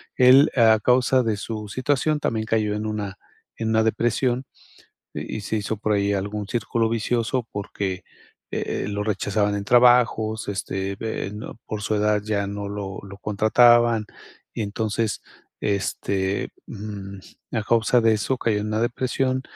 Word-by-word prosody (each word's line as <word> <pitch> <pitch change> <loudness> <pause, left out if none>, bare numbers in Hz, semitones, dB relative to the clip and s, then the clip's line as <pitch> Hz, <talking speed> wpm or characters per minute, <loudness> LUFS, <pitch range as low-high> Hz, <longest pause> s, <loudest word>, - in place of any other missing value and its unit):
Él, 130 +3 +7
a 110 -3 +5
causa 125 +2 +3
de 110 -3 0
su 105 0 -5
situación, 145 +6 0
también 110 -6 -1
cayó 110 -2 +1
en 105 +1 -3
una 105 -2 -4 0.4
en 110 -1 -2
una 110 0 +3
depresión 120 +3 0 0.7
y - - -5
y - - -5
se 105 - -3
hizo 105 +1 -3
por 105 +1 0
ahí 100 0 +1
algún 100 +1 -3
círculo 115 0 0
vicioso 115 +2 -1
porque, 100 -2 -4 0.5
e - - -2
eh, - - -5
lo 100 0 -2
rechazaban 105 0 0
en 100 - -3
trabajos, 120 -2 +4
este, 95 0 -3
ve 110 -2 -4
no 105 +1 -8
por 105 -1 -5
su 110 - -1
edad 105 0 +2
ya 105 -2 -1
no 100 0 -5
lo 100 -2 -5
lo 100 0 -10
contrataban, 115 +2 +4 0.5
y - - -3
entonces, 110 +1 -2 0.4
este, 100 -1 -1 0.2
mm, 100 -2 -7 0.3
a 110 -3 0
causa 115 +2 +3
de 115 0 +4
eso, 125 +5 -1
cayó 110 -4 0
en 105 - -3
una 110 +1 -1
depresión 130 +2 0
110 Hz, 160 wpm, -23 LUFS, 100-120 Hz, 0.7 s, Él